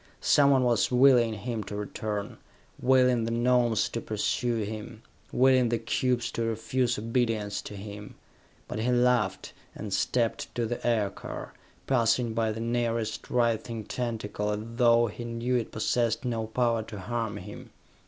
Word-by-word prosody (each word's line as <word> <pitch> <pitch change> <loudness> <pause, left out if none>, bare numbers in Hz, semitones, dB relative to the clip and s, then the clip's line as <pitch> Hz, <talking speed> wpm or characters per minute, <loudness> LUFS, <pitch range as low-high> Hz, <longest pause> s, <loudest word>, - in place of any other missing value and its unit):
Someone 140 -2 +4
was 120 -3 +2
willing 125 -3 +5
him 110 +1 -4
to 105 - -6
return, 105 0 -4 0.4
willing 125 -2 +3
the - - -2
Gnomes 120 -1 +2
to 115 - -4
pursue 115 +2 -1
him, 110 +2 -7 0.3
willing 130 -1 +4
the 120 - +1
cubes 120 +1 0
to - - -3
refuse 120 +2 0
obedience 115 -3 -1
to 105 - -9
him; 105 +1 -9 0.5
but - - -4
he 115 +3 0
laughed 120 -5 +1 0.2
and 105 -2 -5
stepped 115 +3 0
to 120 - 0
the 120 +2 -4
aircar, 110 -4 -2 0.3
passing 115 -2 +2
by 110 -1 0
the 110 - -5
nearest 115 -1 -2
writhing 115 -2 0
tentacle 110 -3 -3
as 105 0 -1 0.2
though 120 -1 +5
he 115 +2 -6
knew 120 +2 -2
it 120 -2 -1
possessed 115 +2 0
no 115 -3 -2
power 115 0 +1
to 110 -1 -8
harm 115 +2 -3
him. - - -9
115 Hz, 150 wpm, -28 LUFS, 110-120 Hz, 0.5 s, willing